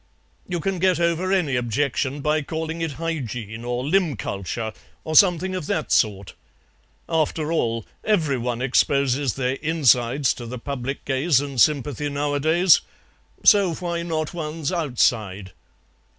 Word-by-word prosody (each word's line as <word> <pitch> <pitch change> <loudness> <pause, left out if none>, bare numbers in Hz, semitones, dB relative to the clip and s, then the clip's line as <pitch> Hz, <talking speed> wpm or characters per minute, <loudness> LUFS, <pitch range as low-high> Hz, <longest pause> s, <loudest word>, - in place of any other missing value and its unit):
"You 175 -1 -2
can 190 +2 -2
get 185 -2 +2
over 170 +2 0
any 175 -9 +1
objection 130 +3 -1
by 150 +2 +1
calling 160 +2 -4
it 165 -3 -2
Hygiene, 125 -8 -5
or 125 +1 -3
limb 170 -2 +2
culture, 100 +4 -4 0.3
or 155 - -4
something 185 +1 +5
of 185 -5 -4
that 155 - -2
sort. 100 -4 +1 0.7
After 160 -1 0
all, 115 -8 -1 0.2
every 160 -11 +1
one 120 +1 -2
exposes 135 0 +1
their 130 0 -1
insides 135 -4 +2
to 120 - -9
the 125 +2 -6
public 135 +1 -5
gaze 135 +2 +2
and 140 -4 -2
sympathy 145 -1 +1
nowadays, 150 +5 +3 0.6
so 195 -5 +5
why 170 -1 -3
not 160 -2 -3
one's 155 -2 -4
outside?" 110 - 0
145 Hz, 135 wpm, -23 LUFS, 125-165 Hz, 0.7 s, something